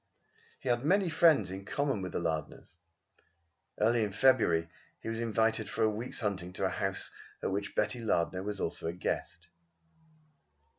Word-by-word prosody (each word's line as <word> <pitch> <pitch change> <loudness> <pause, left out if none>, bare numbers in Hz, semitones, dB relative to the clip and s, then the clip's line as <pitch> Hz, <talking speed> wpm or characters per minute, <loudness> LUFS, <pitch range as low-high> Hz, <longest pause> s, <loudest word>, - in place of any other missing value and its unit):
He - - -9
had 120 0 +2
many 185 +4 +3
friends 155 - +5
in 95 +1 -6
common 135 0 -1
with 90 -2 -5
the - - 0
Lardners. 80 +1 -4 1.0
Early 115 +2 +3
in 105 - -1
February 95 -10 +4 0.3
he - - -6
was 115 0 -2
invited 110 -1 +1
for 115 - 0
a 110 - +5
week's 115 +4 -5
hunting 95 -4 -2
to 95 - -1
a - - +2
house 95 0 -2 0.3
at - - 0
which 100 +1 -3
Betty 125 - +1
Lardner 90 -5 0
was 100 0 -4
also 80 - -2
a 85 - -2
guest. 85 -1 -4
105 Hz, 165 wpm, -31 LUFS, 90-120 Hz, 1.0 s, friends